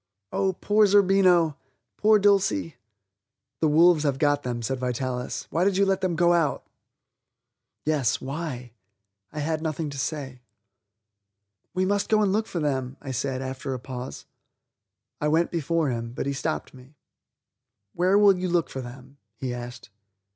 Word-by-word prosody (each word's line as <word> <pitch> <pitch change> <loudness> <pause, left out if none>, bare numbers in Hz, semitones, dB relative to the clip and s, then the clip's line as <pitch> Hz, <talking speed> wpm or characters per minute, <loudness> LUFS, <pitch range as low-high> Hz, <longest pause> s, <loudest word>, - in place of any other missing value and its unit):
Oh, 190 -1 0
poor 210 +3 +3
Zerbino; 185 -5 +4 0.4
poor 215 0 +4
Dulcie! 195 - +2 0.8
"The 160 - +2
wolves 165 +1 +5
have 140 -3 0
got 145 0 +2
them," 120 -2 -4
said 130 +2 -2
Vitalis; 125 0 -3
"why 170 - +1
did 195 0 +2
you 200 - +4
let 195 -1 +1
them 185 -3 0
go 175 +1 +4
out?" 165 -5 0 1.2
Yes? 145 -7 +1
why? 135 -4 -5 0.6
I 150 - -5
had 155 +1 -1
nothing 155 -1 -3
to 140 - -6
say. 135 -3 -4 1.3
"We 185 0 +1
must 205 +1 0
go 215 -1 +4
and 195 -2 +1
look 215 +1 0
for 175 - -4
them," 135 -3 -2
I 135 - -7
said 130 +1 -2
after 130 +1 -4
a - - -6
pause. 125 0 -7 1.0
I 150 - +1
went 160 +3 +2
before 165 -2 0
him, 115 0 -4
but - - -4
he 140 - -1
stopped 135 - -3
me. 130 +3 -16 1.0
"Where 185 +3 +3
will 205 -2 +6
you 180 0 -2
look 170 -2 0
for 130 - -5
them?" 130 +2 -11 0.2
he 125 +2 -4
asked. 120 -2 -8
150 Hz, 160 wpm, -25 LUFS, 130-180 Hz, 1.3 s, will